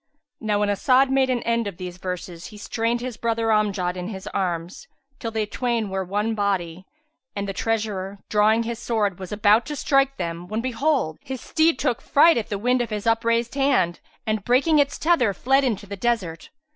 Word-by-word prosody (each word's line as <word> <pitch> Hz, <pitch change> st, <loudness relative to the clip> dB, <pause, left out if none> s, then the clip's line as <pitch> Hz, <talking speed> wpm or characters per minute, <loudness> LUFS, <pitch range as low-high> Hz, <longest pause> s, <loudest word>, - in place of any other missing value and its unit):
Now 210 Hz, -2 st, 0 dB
when 205 Hz, -, +1 dB
As'ad 260 Hz, +6 st, +3 dB
made 265 Hz, -1 st, +3 dB
an 250 Hz, -2 st, 0 dB
end 235 Hz, -1 st, 0 dB
of 195 Hz, -4 st, -6 dB
these 180 Hz, -1 st, -7 dB
verses, 180 Hz, -2 st, -6 dB
he 210 Hz, -, -12 dB
strained 230 Hz, +3 st, -1 dB
his 245 Hz, -2 st, -5 dB
brother 230 Hz, -1 st, 0 dB
Amjad 200 Hz, -4 st, +1 dB
in 180 Hz, 0 st, -5 dB
his 190 Hz, -3 st, -7 dB
arms, 180 Hz, -, -3 dB, 0.3 s
till 230 Hz, -, -3 dB
they 220 Hz, -1 st, -1 dB
twain 230 Hz, -1 st, -2 dB
were 190 Hz, 0 st, -1 dB
one 205 Hz, +4 st, -1 dB
body, 185 Hz, -4 st, -2 dB, 0.5 s
and 200 Hz, 0 st, -3 dB
the 195 Hz, -, -3 dB
treasurer, 205 Hz, -2 st, -2 dB
drawing 215 Hz, +2 st, +3 dB
his 230 Hz, 0 st, -4 dB
sword, 210 Hz, -6 st, -1 dB
was 185 Hz, -2 st, -7 dB
about 210 Hz, +2 st, +3 dB
to 300 Hz, -, -4 dB
strike 275 Hz, -1 st, +2 dB
them, 170 Hz, 0 st, -4 dB
when 215 Hz, +3 st, -2 dB
behold, 255 Hz, -, 0 dB
his 265 Hz, 0 st, -5 dB
steed 320 Hz, +6 st, +2 dB
took 250 Hz, -5 st, -1 dB
fright 315 Hz, -1 st, +5 dB
at 220 Hz, -, -6 dB
the 205 Hz, -, -2 dB
wind 250 Hz, +4 st, +1 dB
of 240 Hz, -, -2 dB
his 210 Hz, 0 st, -4 dB
upraised 230 Hz, +1 st, +1 dB
hand, 265 Hz, -12 st, +2 dB, 0.3 s
and 215 Hz, -2 st, -1 dB
breaking 280 Hz, +7 st, +3 dB
its 285 Hz, -1 st, +1 dB
tether, 275 Hz, -, +2 dB
fled 270 Hz, +2 st, +2 dB
into 220 Hz, -6 st, -1 dB
the 200 Hz, 0 st, -6 dB
desert. 190 Hz, -6 st, -2 dB
220 Hz, 195 wpm, -23 LUFS, 195-245 Hz, 0.5 s, fright